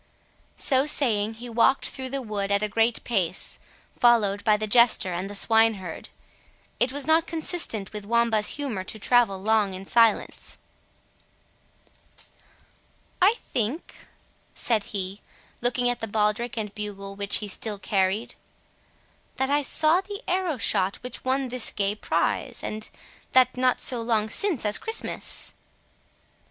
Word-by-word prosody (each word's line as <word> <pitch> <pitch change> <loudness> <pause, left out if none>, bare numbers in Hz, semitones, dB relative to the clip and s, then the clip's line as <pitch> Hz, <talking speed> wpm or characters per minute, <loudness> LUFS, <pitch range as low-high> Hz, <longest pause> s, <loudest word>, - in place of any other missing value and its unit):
So 270 +1 +2
saying, 225 -7 +1
he 240 +2 -9
walked 235 +3 +2
through 260 -1 -5
the 270 0 -4
wood 205 -3 -3
at 200 +1 +1
a - - +1
great 225 +3 0
pace, 190 -7 -1 0.4
followed 210 -4 +3
by 215 -2 +3
the 215 - -2
jester 220 -4 +4
and 185 +3 -4
the 205 - -7
swineherd. 220 -5 +2 0.7
It 250 - +2
was 285 0 -3
not 320 +2 +3
consistent 320 - +1
with 210 -1 -7
Wamba's 230 -1 +1
humour 255 -10 -3
to 205 - -7
travel 230 -2 +2
long 205 -1 +1
in 190 +1 -9
silence. 230 0 +1 2.6
"I 400 +5 +5
think," 245 +8 -3 0.6
said 220 -4 0
he, 195 0 -5 0.4
looking 245 +1 +1
at 245 0 -1
the 225 - -4
baldric 215 +3 -1
and 210 -2 -4
bugle 200 -2 -6
which 200 0 -1
he 210 - -2
still 205 +2 -3
carried, 195 +2 -1 1.0
"that 265 +1 -1
I 290 +1 +3
saw 315 +5 +3
the 405 +3 -9
arrow 360 -5 -1
shot 195 -3 +1
which 250 -1 -8
won 260 0 0
this 250 -1 0
gay 200 0 -1
prize, 215 - -2
and 215 0 -5 0.4
that 255 -1 +4
not 255 0 +1
so 245 -2 -1
long 220 -2 0
since 360 - +2
as 210 0 0
Christmas." 445 0 -2
225 Hz, 145 wpm, -25 LUFS, 205-255 Hz, 2.6 s, I